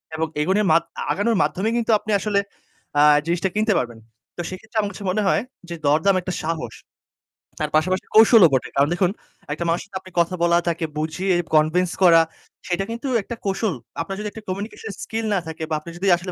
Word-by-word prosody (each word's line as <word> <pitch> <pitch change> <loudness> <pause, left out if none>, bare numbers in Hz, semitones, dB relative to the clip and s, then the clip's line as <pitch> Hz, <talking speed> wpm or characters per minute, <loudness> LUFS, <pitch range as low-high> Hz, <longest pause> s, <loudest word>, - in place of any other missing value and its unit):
এবং 160 0 -1
এগুলির 190 +6 +2
মাত 165 - +4 0.3
আগানোর 215 +2 +1
মাধ্যমে 180 +9 -1
কিন্তু 235 -1 0
আপনি 215 - -5
আসলে 205 -1 +1 0.6
আ - - +6 0.2
জিনিসটা 170 +3 0
কিনতে 215 0 +2
পারবেন। 120 -2 -3 0.4
তো - - -2
সেক্ষেত্রে 220 +4 -8
আমার 205 -1 -1
কাছে 205 - -9
মনে 215 +3 0
হয় - - +3 0.3
যে 170 - -4
দরদাম 160 +7 +3
একটা 180 0 -4
সাহস, 160 0 -3 0.9
তার 150 - -1
পাশাপাশি 185 +4 +1
কৌশলও 220 -3 +8
বটে। 130 - +1
কারণ 140 +1 +3
দেখুন, 180 0 +1 0.4
একটা 155 - -4
মানুষের 170 +1 0
সাথে 195 -1 -6
আপনি 185 - -14
কথা 170 +2 +1
বলা, 170 0 +4
তাকে 170 -1 0
বুঝিয়ে 160 +5 -1 0.2
convince 165 +4 +3
করা 165 -2 +7 0.5
সেইটা 185 +2 -1
কিন্তু 235 +4 -5 0.2
একটা 235 - -6
কৌশল। 195 0 0 0.3
আপনার 195 +4 -4
যদি 210 - -4
একটা 220 - -10
communication 205 +3 -5
skill 225 0 -3
না 195 - +2
থাকে 160 0 -6
বা 155 - 0
আপনার 170 +2 -10
যদি 195 +3 -2
আসলে 180 +2 -6
185 Hz, 195 wpm, -22 LUFS, 165-205 Hz, 0.9 s, কৌশলও